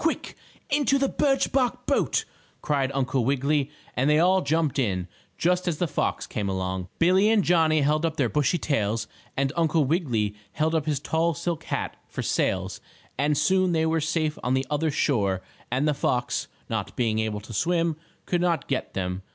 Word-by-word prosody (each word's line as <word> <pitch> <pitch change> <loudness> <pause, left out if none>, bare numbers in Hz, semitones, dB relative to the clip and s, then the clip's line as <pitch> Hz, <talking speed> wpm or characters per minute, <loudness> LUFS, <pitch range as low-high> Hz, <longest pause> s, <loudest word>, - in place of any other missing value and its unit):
"Quick! 325 - -1 0.4
Into 280 -1 +3
the 275 0 +2
birch 270 -1 +1
bark 255 -3 0
boat!" - - +1 0.4
cried 140 -3 +1
Uncle 130 -1 +1
Wiggily, 140 +2 +1 0.3
and 130 +4 +2
they 150 - +5
all 185 +3 +4
jumped 155 -4 +1
in, 95 -7 0 0.3
just 180 +1 +1
as 165 -4 0
the 175 - +1
fox - - -1
came 100 -2 -3
along. 95 -1 -2
Billie 185 +5 +4
and 220 -3 +4
Johnnie 160 -3 +3
held 150 +3 +2
up 160 -1 -1
their 130 - +2
bushy 150 +6 +1
tails, 110 -8 -1 0.3
and 135 +1 +1
Uncle 160 -2 +2
Wiggily 125 - 0 0.2
held 160 +1 0
up 160 -2 0
his 150 -3 +1
tall 160 +2 0
silk 165 +1 -3
hat - - -3
for - - -5
sails, - - -1 0.4
and 145 +1 +2
soon 185 +1 +3
they 160 -1 +2
were 160 0 +1
safe 155 0 -1
on 125 +1 +1
the 130 0 0
other 155 +2 +1
shore 100 -10 +1 0.3
and 130 +5 +1
the 150 - +3
fox, 125 -3 -1 0.2
not - - -3
being 110 -3 +1
able 110 -1 -1
to 110 +2 -10
swim, 170 - +1 0.3
could 175 -1 0
not 175 -2 +1
get 135 - -2
them. 90 0 -2
150 Hz, 185 wpm, -26 LUFS, 125-170 Hz, 0.4 s, they